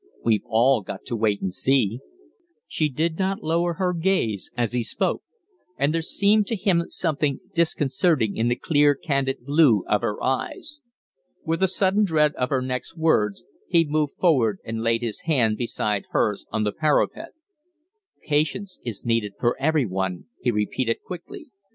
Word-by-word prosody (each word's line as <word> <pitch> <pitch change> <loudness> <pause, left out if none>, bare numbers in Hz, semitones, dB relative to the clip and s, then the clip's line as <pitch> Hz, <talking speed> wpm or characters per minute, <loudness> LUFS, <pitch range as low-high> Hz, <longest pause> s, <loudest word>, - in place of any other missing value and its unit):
"We've 110 -3 +3
all 120 +2 +3
got 95 0 -8
to 120 - -3
wait 105 -2 0
and 95 -2 -2
see." 125 -2 +1 0.7
She 155 -2 -1
did 160 +5 -2
not 195 +1 -1
lower 170 +2 0
her 185 0 0
gaze 165 - 0
as 120 -3 0
he 125 0 0
spoke; 115 - -1 0.6
and 140 +2 +1
there 165 - 0
seemed 200 +5 +2
to 230 - -1
him 185 -4 +2
something 150 -4 -1
disconcerting 150 - +1
in 115 - 0
the 120 - +2
clear, 145 +1 +3
candid 135 -3 -2
blue 140 - +4
of 105 - +2
her 105 - -2
eyes. 290 - -2 0.6
With 165 +2 -1
a 190 - +5
sudden 190 +2 +2
dread 155 -5 +2
of 125 - -2
her 130 -2 0
next 130 +6 -4
words, 105 -11 +1 0.2
he 170 -2 +3
moved 150 -1 0
forward 125 - +3
and 110 0 -4
laid 115 +1 +1
his 115 -3 -3
hand 125 -9 +2
beside 105 -4 -2
hers - - 0
on 110 - -1
the 105 - 0
parapet. 155 - 0 0.9
"Patience 155 +6 -1
is 115 -5 -4
needed 115 -4 0
for 120 - +1
every 150 -1 +2
one," 95 -2 -3 0.2
he 125 - +1
repeated, 115 +2 -1
quickly. 285 - -9
140 Hz, 165 wpm, -24 LUFS, 115-165 Hz, 0.9 s, a